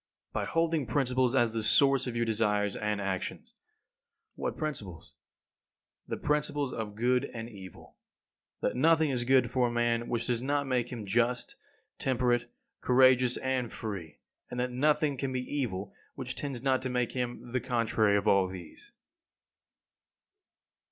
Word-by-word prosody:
By - - -1
holding 165 -4 0
principles 130 0 +1
as 120 -4 +3
the 115 - -1
source 135 +4 +4
of 120 - -4
your 120 0 +1
desires 105 -3 +1
and 105 -1 -1
actions. 100 - -4 0.8
What - - -4
principles? 110 - -5 0.9
The - - -3
principles 145 -2 0
of 105 -2 -5
good 125 +4 +2
and 115 0 -5
evil: 95 -5 -12 0.6
That - - 0
nothing 160 +2 +4
is 120 -2 -1
good 130 -2 +4
for 125 -1 +2
a - - -3
man 120 0 0
which 120 -1 -1
does 120 -1 0
not 140 +2 0
make 125 -2 0
him 115 -4 -5
just, 120 +4 0 0.4
temperate, 125 -2 +1 0.3
courageous, 130 -1 +4
and 130 -3 -1
free; 95 -8 -6 0.3
and 125 - -5
that 125 0 -1
nothing 145 +2 +2
can 135 0 -2
be 130 -1 -1
evil 120 -8 -3 0.2
which - - -4
tends 135 -4 -4
not 130 -1 +2
to 130 - -2
make 125 -1 0
him 120 -1 -4
the 130 0 0
contrary 110 -4 +2
of 100 +1 -1
all 100 -2 +4
these. 90 -3 -10
125 Hz, 150 wpm, -30 LUFS, 110-130 Hz, 0.9 s, source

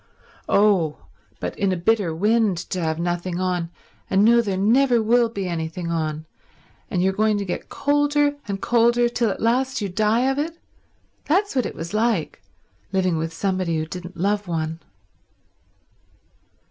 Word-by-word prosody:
"Oh, 195 -7 +2 0.3
but - - -4
in 200 -2 +2
a 185 - 0
bitter 195 0 +1
wind 210 +1 +2
to 185 - -1
have 160 -1 -1
nothing 175 +1 -2
on 180 -2 -1 0.4
and 195 +2 +4
know 235 +1 +6
there 200 -4 -2
never 240 +5 +3
will 230 +2 +3
be 200 -4 -4
anything 170 0 -4
on 155 -1 -2 0.6
and 180 - 0
you 190 - +3
going 215 +1 +1
to 200 - -3
get 180 - -5
colder 290 0 +1
and 200 -1 -3
colder 240 +1 +3
till 235 -1 0
at - - -4
last 260 +3 +1
you 205 -3 -3
die 215 +5 +2
of 270 +1 0
it—that's 330 +3 -4
what 255 - +1
it - - -8
was 170 +4 -6
like, 215 -7 0 0.5
living 185 -3 +1
with 165 +1 -3
somebody 185 -1 -1
who 155 - -1
didn't 180 +2 -8
love 205 +2 0
one." 160 -1 -3
200 Hz, 160 wpm, -22 LUFS, 175-235 Hz, 0.6 s, know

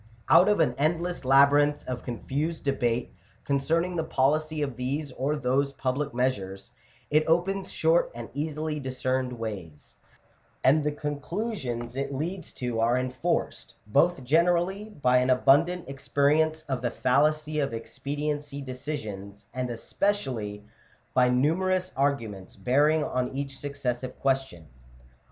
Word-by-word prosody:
Oat 175 +4 +8
of 210 -3 +3
an 145 -7 +3
endless 170 +2 0
labyrinth 145 +2 +5
of 125 -1 -4
con 120 -1 -5
fused 155 +4 -2
debate 125 -4 0 0.3
concerning 165 +6 0
the 165 - 0
policy 155 +1 +1
of 135 -4 -3
these 140 +3 -3
or 135 +4 -1
those 140 0 0
public 140 +2 -2
measures, 100 -7 -2 0.4
it 155 +1 +4
opens 185 +4 +1
short 165 +2 +2
and 120 -1 -6
easily 150 +1 -3
discerned 130 -1 -2
ways; 100 -10 -7 0.7
and 145 +4 +5
the 150 - +1
conclusions 145 - -4
it 140 +1 -2
leads 165 +6 -4
to 120 -3 -3
are 120 +2 +3
enforced, 130 0 -2
both 140 +7 +2
generally, 175 +8 +2
by 125 -10 +2
an 125 +1 +2
abundant 160 +7 +3
experience 150 +3 +1
of 135 -5 -3
the 120 - 0
fallacy 150 +5 +1
of 140 -1 0
expediency 145 +4 -4
decisions* 125 -8 -6
and 125 0 -2
specially, 115 - -2 0.5
by 125 -1 +4
numerous 185 +8 +1
arguments 115 -9 -1
bearing 150 +5 +3
on 125 -3 -1
each 140 0 -4
succes 140 -3 -3
sive 130 0 -7
question. 135 -11 -1
140 Hz, 135 wpm, -27 LUFS, 125-155 Hz, 0.7 s, Oat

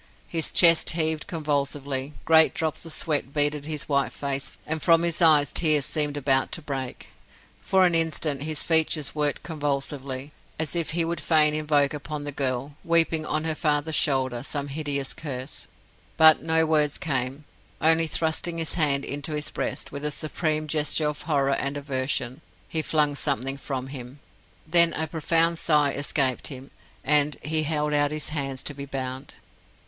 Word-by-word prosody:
His 165 -2 +1
chest 170 -2 +6
heaved 160 -1 -1
convulsively, 145 -3 -2
great 160 0 +6
drops 160 -3 -2
of - - -1
sweat 150 -5 +1
beaded 145 0 +1
his 155 -2 -4
white 140 -2 +1
face, 140 -1 -3 0.2
and 160 0 -2
from 165 0 +4
his 170 0 -1
eyes 150 -5 +5
tears 155 -4 +2
seemed 150 -2 -1
about 135 -1 +1
to 165 - -1
break. 135 -3 -6 0.5
For 190 -1 +3
an 175 - +2
instant 160 -3 0
his 155 0 -3
features 160 -2 +2
worked 150 -1 -1
convulsively, 140 -3 -4 0.3
as 160 +1 -1
if 170 -2 -1
he 165 - +2
would 170 +1 -3
fain 155 -2 +4
invoke 150 -2 +1
upon 150 0 -6
the 145 - -4
girl, 135 0 -3
weeping 165 -2 +1
on 155 0 -1
her 160 0 -1
father's 155 0 0
shoulder, 130 -5 +1
some 145 +1 -4
hideous 140 -2 -3
curse. 135 -2 -7 0.5
But 160 -1 +8
no 160 0 +1
words 150 -2 +2
came 135 0 -3 0.3
only 165 +1 +4
thrusting 165 +2 -1
his 165 -1 -1
hand 145 -4 +1
into 145 +2 -4
his 150 0 -3
breast, - - -4
with 140 - -7
a 150 - 0
supreme 155 +1 -2
gesture 150 0 +1
of 150 - -6
horror 140 -4 +1
and 140 +1 -1
aversion, 130 -2 -3 0.3
he 160 - -2
flung 150 -2 +1
something 135 -2 -2
from 135 -2 -5
him. 130 0 -9 0.5
Then 170 +1 +4
a 160 - -2
profound 165 +1 +1
sigh 150 -3 +2
escaped 140 -2 0
him, 135 -1 -9 0.3
and 150 0 +3
he 155 +1 +1
held 150 -1 -1
out 145 0 +2
his 155 0 -2
hands 135 -3 -4
to 150 - -3
be 140 0 -7
bound. 130 0 -6
150 Hz, 170 wpm, -25 LUFS, 140-160 Hz, 0.5 s, But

